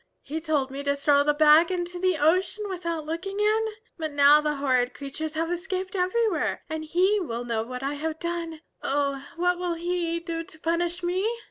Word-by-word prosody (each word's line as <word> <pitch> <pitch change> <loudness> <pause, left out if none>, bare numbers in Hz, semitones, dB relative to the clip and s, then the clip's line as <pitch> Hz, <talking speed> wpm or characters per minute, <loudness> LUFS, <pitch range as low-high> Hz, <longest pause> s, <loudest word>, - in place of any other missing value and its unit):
He 315 +3 -4
told 295 -4 0
me 275 +1 -5
to 280 0 0
throw 285 0 +3
the 295 0 +2
bag 310 +2 +6
into 355 -1 -3
the 370 -2 +2
ocean 365 +7 +1
without 335 -4 -3
looking 365 +6 -4
in. 430 +1 +3 0.3
But 315 -1 -2
now 285 +1 +6
the 300 0 0
horrid 255 -3 +1
creatures 300 +3 -5
have 330 +2 -1
escaped 370 +1 -3
everywhere 385 +2 0
and 315 0 -4
He 370 +6 +2
will 240 -9 -4
know 230 -2 -1
what 250 +3 -6
I 280 +1 -1
have 310 +2 -3
done. 335 -2 -4 0.2
Oh, 280 -1 -1
what 355 +1 +1
will 355 -1 -1
He 340 0 -1
do 335 -1 -4
to 360 0 -14
punish 345 +2 -1
me?" 370 +5 +1
330 Hz, 195 wpm, -26 LUFS, 290-360 Hz, 0.3 s, bag